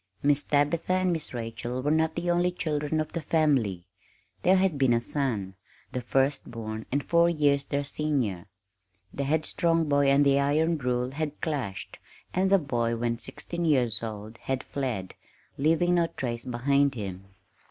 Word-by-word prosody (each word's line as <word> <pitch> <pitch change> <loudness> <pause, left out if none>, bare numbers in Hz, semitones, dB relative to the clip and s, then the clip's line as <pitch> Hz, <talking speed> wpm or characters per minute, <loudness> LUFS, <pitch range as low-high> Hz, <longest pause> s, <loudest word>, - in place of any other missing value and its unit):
Miss 145 0 +4
Tabitha 150 +5 +1
and 185 -1 +2
Miss 160 -2 -2
Rachel 120 +1 -4
were 145 - +1
not 160 0 +2
the 175 0 0
only 175 +1 +2
children 155 -3 -1
of 155 0 -3
the 170 - -2
family. 135 - +1 0.6
There 185 +2 +5
had 185 -6 +1
been 130 -3 +4
a 115 - +3
son 115 -7 -2 0.4
the 125 - -3
first 135 +3 0
born, 110 -2 -6
and 140 +2 0
four 170 0 +4
years 145 -4 +2
their 140 0 -1
senior. 135 - -2 0.7
The 140 - -2
headstrong 160 +2 +1
boy 145 -1 +3
and 140 +1 +5
the 140 0 +4
iron 155 +3 +2
rule 125 -1 -1
had 150 +1 -4
clashed, 135 - -4 0.3
and 190 +1 +2
the 195 - +6
boy, 120 -8 -1
when 115 0 -1
sixteen 170 +8 -5
years 130 -8 +2
old, 110 0 -7
had 135 -1 -2
fled, 125 -10 -3 0.5
leaving 165 +4 +3
no 170 -1 +3
trace 120 -6 -4
behind 140 +3 +1
him. 95 -4 -6
140 Hz, 165 wpm, -27 LUFS, 120-160 Hz, 0.7 s, the